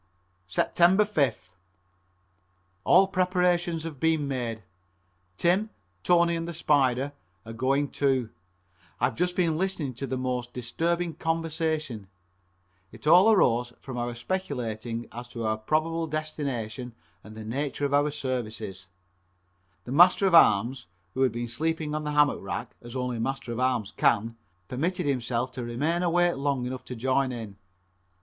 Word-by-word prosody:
Sept. -, -, 0 dB
5th. 170 Hz, -, +3 dB, 1.4 s
All 190 Hz, +2 st, +6 dB
preparations 180 Hz, -3 st, +1 dB
have 160 Hz, -5 st, -7 dB
been 160 Hz, -2 st, +1 dB
made. 120 Hz, -5 st, -3 dB, 0.7 s
Tim, 190 Hz, +6 st, +2 dB, 0.3 s
Tony 170 Hz, -, +3 dB
and 165 Hz, 0 st, -3 dB
the 170 Hz, -, -5 dB
Spider 140 Hz, -3 st, +2 dB, 0.3 s
are 115 Hz, -, -7 dB
going 135 Hz, +4 st, +1 dB
too. 130 Hz, -5 st, 0 dB, 0.7 s
I 120 Hz, -, +3 dB
have 130 Hz, -, -1 dB
just 180 Hz, +1 st, 0 dB
been 165 Hz, -3 st, +1 dB
listening 180 Hz, -8 st, -2 dB
to 135 Hz, +3 st, -5 dB
the 130 Hz, -, -2 dB
most 125 Hz, -1 st, -3 dB
disturbing 165 Hz, +8 st, -1 dB
conversation. 160 Hz, -, -2 dB, 0.8 s
It -, -, -13 dB
all 180 Hz, +8 st, +7 dB
arose 120 Hz, -, +3 dB
from 130 Hz, -2 st, -6 dB
our 120 Hz, 0 st, -3 dB
speculating 120 Hz, -, -3 dB
as 120 Hz, +1 st, -8 dB
to 120 Hz, -2 st, -5 dB
our 110 Hz, 0 st, +1 dB
probable 155 Hz, +8 st, -1 dB
destination 135 Hz, -6 st, -4 dB, 0.3 s
and 110 Hz, 0 st, -12 dB
the 110 Hz, -, -7 dB
nature 140 Hz, +5 st, -2 dB
of 140 Hz, -, -1 dB
our 145 Hz, +1 st, +3 dB
services. 110 Hz, -8 st, -4 dB, 1.0 s
The 120 Hz, -, -8 dB
Master 175 Hz, +7 st, +6 dB
at 190 Hz, -, +2 dB
arms, 120 Hz, -, +5 dB, 0.3 s
who 130 Hz, -, -2 dB
had 130 Hz, -2 st, +4 dB
been 120 Hz, +1 st, -4 dB
sleeping 155 Hz, +5 st, -2 dB
on 155 Hz, 0 st, -3 dB
the 150 Hz, -, -2 dB
hammock 145 Hz, -1 st, +3 dB
rack -, -, -5 dB
as 120 Hz, +1 st, -10 dB
only 125 Hz, -2 st, -2 dB
a -, -, -5 dB
Master 130 Hz, 0 st, -3 dB
at 115 Hz, -, -4 dB
arms 125 Hz, -5 st, 0 dB
can, 115 Hz, +3 st, +2 dB, 0.3 s
permitted 165 Hz, +9 st, -1 dB
himself 125 Hz, -2 st, -1 dB
to 125 Hz, -, -6 dB
remain 145 Hz, +9 st, -1 dB
awake 175 Hz, -2 st, +2 dB
long 135 Hz, -2 st, -1 dB
enough 130 Hz, +1 st, -5 dB
to 125 Hz, -, -6 dB
join 130 Hz, +2 st, +1 dB
in. 110 Hz, -5 st, -7 dB
135 Hz, 150 wpm, -27 LUFS, 120-165 Hz, 1.4 s, all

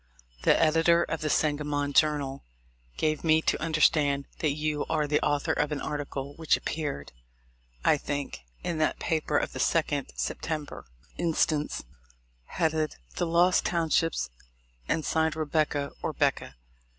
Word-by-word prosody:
The -, -, +4 dB
editor 165 Hz, +2 st, +4 dB
of 165 Hz, -, -3 dB
the 155 Hz, -, -1 dB
Sangamon 145 Hz, -1 st, 0 dB
Journal 145 Hz, -3 st, +2 dB, 0.5 s
gave 155 Hz, -1 st, 0 dB
me 160 Hz, -1 st, +5 dB
to -, -, +1 dB
understand 150 Hz, -3 st, +2 dB
that 155 Hz, -, +2 dB
you 150 Hz, 0 st, -1 dB
are 155 Hz, -2 st, +1 dB
the 150 Hz, +1 st, +1 dB
author 145 Hz, -1 st, +1 dB
of 150 Hz, 0 st, 0 dB
an 150 Hz, -, -2 dB
article 140 Hz, -1 st, -4 dB
which 160 Hz, -1 st, +2 dB
appeared, 145 Hz, -, -4 dB, 0.7 s
I -, -, +5 dB
think, 145 Hz, 0 st, -4 dB, 0.2 s
in 170 Hz, -2 st, -2 dB
that 155 Hz, -, +1 dB
paper 155 Hz, -2 st, 0 dB
of -, -, -1 dB
the -, -, -6 dB
2d 145 Hz, -4 st, 0 dB
September 155 Hz, -3 st, -4 dB, 0.3 s
inst, 165 Hz, -1 st, +2 dB, 0.9 s
headed 155 Hz, -, 0 dB, 0.2 s
"The -, -, 0 dB
Lost 175 Hz, +2 st, +4 dB
Townships" 165 Hz, -, +1 dB, 0.6 s
and 160 Hz, -, 0 dB
signed 160 Hz, -1 st, +1 dB
Rebecca 150 Hz, -2 st, 0 dB
or -, -, -2 dB
'Becca. 65 Hz, -, 0 dB
155 Hz, 140 wpm, -28 LUFS, 145-160 Hz, 0.9 s, me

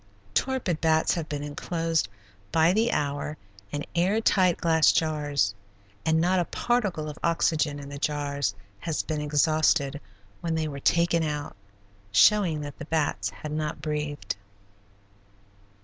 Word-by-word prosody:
Torpid 250 Hz, -11 st, 0 dB
bats 160 Hz, -1 st, +3 dB
have 165 Hz, -3 st, -3 dB
been 145 Hz, -1 st, -3 dB
inclosed 165 Hz, -, -1 dB, 0.4 s
by 165 Hz, +2 st, +4 dB
the 225 Hz, +3 st, +2 dB
hour 145 Hz, +1 st, -2 dB, 0.3 s
in 145 Hz, 0 st, -3 dB
air 185 Hz, +5 st, +2 dB
tight 185 Hz, -5 st, +3 dB
glass 160 Hz, -2 st, +4 dB
jars 145 Hz, -8 st, +1 dB, 0.5 s
and 160 Hz, 0 st, +2 dB
not 180 Hz, +3 st, +3 dB
a 175 Hz, -, +1 dB
particle 205 Hz, -11 st, -1 dB
of 150 Hz, -, -7 dB
oxygen 160 Hz, -3 st, +1 dB
in 140 Hz, -1 st, -8 dB
the 140 Hz, 0 st, -7 dB
jars 140 Hz, -7 st, -1 dB, 0.2 s
has 160 Hz, +5 st, -2 dB
been 155 Hz, -2 st, -3 dB
exhausted 150 Hz, -1 st, +2 dB, 0.4 s
when 165 Hz, -1 st, -2 dB
they 160 Hz, -1 st, 0 dB
were 140 Hz, -2 st, -6 dB
taken 170 Hz, +3 st, +3 dB
out, 150 Hz, -2 st, -3 dB, 0.6 s
showing 160 Hz, -, +4 dB
that 145 Hz, -1 st, -7 dB
the 155 Hz, -, -6 dB
bats 145 Hz, -12 st, 0 dB
had 125 Hz, +11 st, -8 dB
not 155 Hz, 0 st, -2 dB
breathed. 150 Hz, -1 st, -3 dB
155 Hz, 140 wpm, -27 LUFS, 145-170 Hz, 0.6 s, by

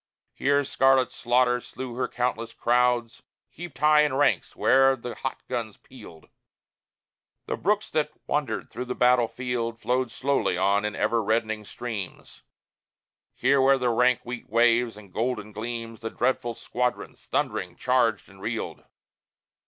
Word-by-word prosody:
Here 140 Hz, +1 st, +2 dB
scarlet 135 Hz, -1 st, +3 dB
Slaughter 125 Hz, 0 st, +2 dB
slew 130 Hz, 0 st, -7 dB
her 125 Hz, +1 st, -1 dB
countless 115 Hz, -2 st, -2 dB
crowds 120 Hz, -1 st, +1 dB, 0.3 s
Heaped 175 Hz, -2 st, -10 dB
high 150 Hz, +1 st, +5 dB
in 150 Hz, -3 st, +1 dB
ranks 145 Hz, +1 st, +1 dB
where'er 135 Hz, 0 st, +4 dB
the 120 Hz, -1 st, -7 dB
hot -, -, -5 dB
guns -, -, -4 dB
pealed. 80 Hz, -1 st, -14 dB, 1.2 s
The -, -, -2 dB
brooks 210 Hz, +2 st, 0 dB
that 155 Hz, -1 st, +1 dB, 0.2 s
wandered 145 Hz, -1 st, -2 dB
through 125 Hz, -, -5 dB
the 125 Hz, -, -4 dB
battlefield 125 Hz, -1 st, +1 dB
Flowed 125 Hz, +1 st, 0 dB
slowly 135 Hz, -6 st, 0 dB
on 100 Hz, +2 st, +2 dB
in 105 Hz, -, -2 dB
ever 115 Hz, +2 st, +1 dB
reddening 110 Hz, 0 st, -1 dB
streams; 110 Hz, -5 st, -7 dB, 0.9 s
Here 140 Hz, 0 st, +3 dB
where 135 Hz, +1 st, +5 dB
the 125 Hz, -2 st, +1 dB
rank 125 Hz, +1 st, +3 dB
wheat 125 Hz, 0 st, -7 dB
waves 115 Hz, 0 st, +3 dB
and 100 Hz, -4 st, -14 dB
golden 110 Hz, -2 st, -2 dB
gleams, 115 Hz, +1 st, -6 dB
The 115 Hz, -, -4 dB
dreadful 120 Hz, -1 st, -1 dB
squadrons, 125 Hz, +2 st, -3 dB
thundering, 90 Hz, -2 st, -2 dB
charged 125 Hz, -3 st, +1 dB
and 95 Hz, 0 st, -17 dB
reeled. 110 Hz, +2 st, -4 dB
120 Hz, 140 wpm, -26 LUFS, 115-130 Hz, 1.2 s, high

